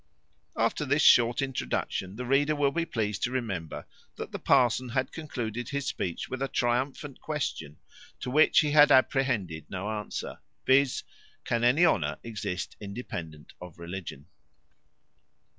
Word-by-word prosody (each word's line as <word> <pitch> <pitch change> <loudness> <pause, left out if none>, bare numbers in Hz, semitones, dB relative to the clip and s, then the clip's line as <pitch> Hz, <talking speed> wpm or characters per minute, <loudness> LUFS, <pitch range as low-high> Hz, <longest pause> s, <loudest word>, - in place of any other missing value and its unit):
After - - +1
this - - +2
short 120 +3 +5
introduction, 95 - -3
the 125 +3 -5
reader 145 +4 +2
will 145 -1 +2
be 170 +3 -1
pleased 105 - -2
to 125 - 0
remember, 100 -11 -4 0.3
that - - -7
the - - -5
parson 125 0 +3
had 130 +3 -1
concluded 120 -6 -5
his 140 0 -3
speech 85 -3 -3
with 130 0 -5
a 135 - 0
triumphant 130 +3 -2
question, 105 - -4 0.4
to 125 - -5
which 155 +4 +5
he 150 -2 0
had 145 0 +7
apprehended 125 - +2
no 95 +3 -4
answer; 105 -2 -5 0.3
viz., 130 0 +3 0.4
Can 120 0 0
any 135 +9 +5
honour 165 - +1
exist 100 -5 -5
independent 85 -8 -7
on 90 -2 -9
religion? 85 -4 -7
120 Hz, 140 wpm, -28 LUFS, 95-135 Hz, 0.4 s, had